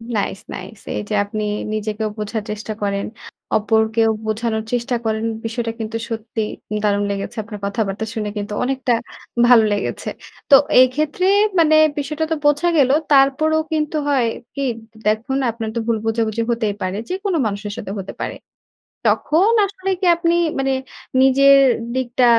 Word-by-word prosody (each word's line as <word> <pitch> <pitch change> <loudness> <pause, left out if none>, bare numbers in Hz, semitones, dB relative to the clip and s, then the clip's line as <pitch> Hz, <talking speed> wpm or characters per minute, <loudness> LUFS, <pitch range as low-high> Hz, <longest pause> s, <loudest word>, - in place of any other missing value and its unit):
Nice, 200 -2 -1
nice. 195 +3 -9 0.2
এই - - -2
যে - - -2
আপনি 215 +1 -4 0.3
নিজেকেও 215 0 -2
বোঝার 215 +1 -3
চেষ্টা 215 +1 -5
করেন, 200 -1 -1 0.5
অপরকেও 220 +1 +2 0.2
বোঝানোর 220 0 -1
চেষ্টা 245 0 0
করেন। 220 0 0 0.2
বিষয়টা 230 0 -2
কিন্তু 225 0 -3
সত্যি 225 0 -4 0.4
দারুণ 205 -1 +2
লেগেছে। 200 +3 -4
আপনার 210 -1 -8
কথাবার্তা 200 +1 -2
শুনে 210 -2 -3
কিন্তু 205 0 -4
অনেকটা 260 -1 0 0.5
ভালো 240 -2 +7
লেগেছে। 205 - -3 0.4
তো 280 - +10 0.2
এইক্ষেত্রে 295 +7 +2 0.3
মানে 310 -1 +5 0.2
বিষয়টা 300 +2 -2
তো - - +3
বোঝা 295 +4 +3
গেল। 270 -3 +4 0.2
তারপরও 280 +3 +4
কিন্তু 305 0 -1
হয় 265 -5 +2 0.3
কি 280 - -3 0.3
দ - - -36
দেখুন 220 +5 0
আপনার 225 -1 -5
তো - - 0
ভুল 230 -1 +2
বোঝাবুঝি 225 0 0
হতেই 225 -3 0
পারে। 185 +1 -2
যেকোনো 380 -1 -1
মানুষের 205 0 -3
সাথে 195 - -6
হতে 195 - -6
পারে। - - -3 0.7
তখন 360 +9 +3
আসলে 385 -1 -5
কি 380 - -1
আপনি 335 0 +1 0.3
মানে 270 0 +1 0.5
নিজের 275 +1 +6 0.4
দিকটা 255 -1 +1
230 Hz, 150 wpm, -20 LUFS, 215-275 Hz, 0.7 s, তো